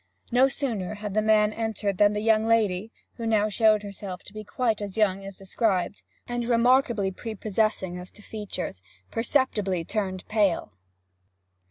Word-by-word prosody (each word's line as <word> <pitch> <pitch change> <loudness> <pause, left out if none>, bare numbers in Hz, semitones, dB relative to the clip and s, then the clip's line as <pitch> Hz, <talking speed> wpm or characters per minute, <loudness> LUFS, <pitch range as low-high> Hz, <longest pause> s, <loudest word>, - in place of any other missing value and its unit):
No 250 +2 +5
sooner 230 -9 -3
had 205 -1 -5
the 215 - +3
old 215 - -1
man 215 -1 +4
entered 215 -4 -2
than 205 0 +5
the 210 - -2
young 220 0 +3
lady 215 -2 +2 0.3
who 230 -2 -3
now 215 -1 +3
showed 215 0 +3
herself 200 -2 -7
to 205 - -13
be 215 0 -7
quite 225 0 -1
as 205 0 -5
young 195 -3 +2
as 195 -1 -8
described, 195 -1 -1 0.3
and 240 0 -2
remarkably 235 -3 +3
prepossessing 215 -3 -2
as 180 +1 -9
to 210 - -16
features 200 - -5 0.3
perceptibly 215 - 0
turned 190 -3 -3
pale. 200 - +1
210 Hz, 160 wpm, -26 LUFS, 195-225 Hz, 0.3 s, No